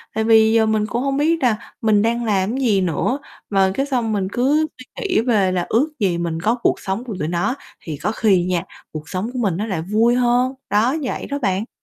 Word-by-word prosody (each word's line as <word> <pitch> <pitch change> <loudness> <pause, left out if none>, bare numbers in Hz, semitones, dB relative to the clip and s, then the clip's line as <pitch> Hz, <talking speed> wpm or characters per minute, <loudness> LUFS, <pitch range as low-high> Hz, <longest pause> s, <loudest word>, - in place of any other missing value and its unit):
Tại 220 - +1
vì 220 0 +5
giờ 225 -1 +4
mình 220 -1 +1
cũng 240 +3 -2
hông 275 0 0
biết 320 0 +1
là 225 -3 0
mình 215 -2 +3
đang 235 +1 0
làm 205 +2 0
gì 220 -8 +2
nữa 185 - 0 0.3
mà 195 -2 +3
cái 275 - 0
xong 245 -6 -1
mình 195 -2 -1
cứ 295 +6 +2
suy 255 - -11 0.2
nghĩ 365 - +2
về 210 -6 +2
là 180 -1 -1
ước 275 +8 +2
gì 185 -5 +1
mình 170 -1 -2
có 220 +6 +2
cuộc - - +2
sống 195 +5 -3
của 225 -6 -6
tụi 150 - -1
nó 175 +9 0 0.3
thì 155 -3 -6
có 210 - -2
khi 200 -5 +2
nha 180 -2 0 0.3
cuộc 155 0 -8
sống 190 +5 -3
của 255 - -3
mình 195 -8 0
nó 210 - -2
lại 190 -7 -2
vui 220 +7 +2
hơn, 250 +1 +2 0.2
đó, 225 +8 +2
vậy 255 - -3
đó 285 0 -3
bạn. 200 -1 -1
220 Hz, 240 wpm, -20 LUFS, 190-245 Hz, 0.3 s, vì